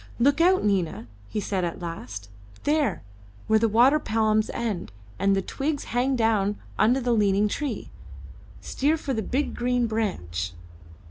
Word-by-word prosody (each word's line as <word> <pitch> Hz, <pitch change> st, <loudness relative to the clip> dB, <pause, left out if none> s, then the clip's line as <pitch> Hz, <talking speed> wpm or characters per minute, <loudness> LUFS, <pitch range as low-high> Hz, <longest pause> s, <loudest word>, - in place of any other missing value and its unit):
"Look 280 Hz, +6 st, +3 dB
out, 370 Hz, +2 st, +4 dB
Nina," 175 Hz, -, 0 dB, 0.2 s
he -, -, -2 dB
said 195 Hz, -2 st, -1 dB
at 170 Hz, -1 st, -3 dB
last; 120 Hz, -, -6 dB, 0.4 s
"there, 295 Hz, -1 st, +1 dB, 0.4 s
where 220 Hz, 0 st, +4 dB
the 225 Hz, 0 st, +2 dB
water 250 Hz, +8 st, +5 dB
palms 215 Hz, -3 st, +1 dB
end 215 Hz, -, -3 dB, 0.3 s
and 195 Hz, 0 st, +3 dB
the 195 Hz, -, 0 dB
twigs 285 Hz, +6 st, -2 dB
hang 255 Hz, +2 st, +2 dB
down 215 Hz, -3 st, +1 dB, 0.2 s
under 245 Hz, +5 st, +4 dB
the 245 Hz, -2 st, +1 dB
leaning 205 Hz, -1 st, +3 dB
tree. 285 Hz, +7 st, -4 dB, 0.7 s
Steer 300 Hz, +4 st, 0 dB
for 275 Hz, -3 st, -3 dB
the 220 Hz, -, -1 dB
big 270 Hz, +7 st, -1 dB
green 245 Hz, 0 st, +1 dB
branch." 95 Hz, -, -2 dB
220 Hz, 150 wpm, -25 LUFS, 195-260 Hz, 0.7 s, water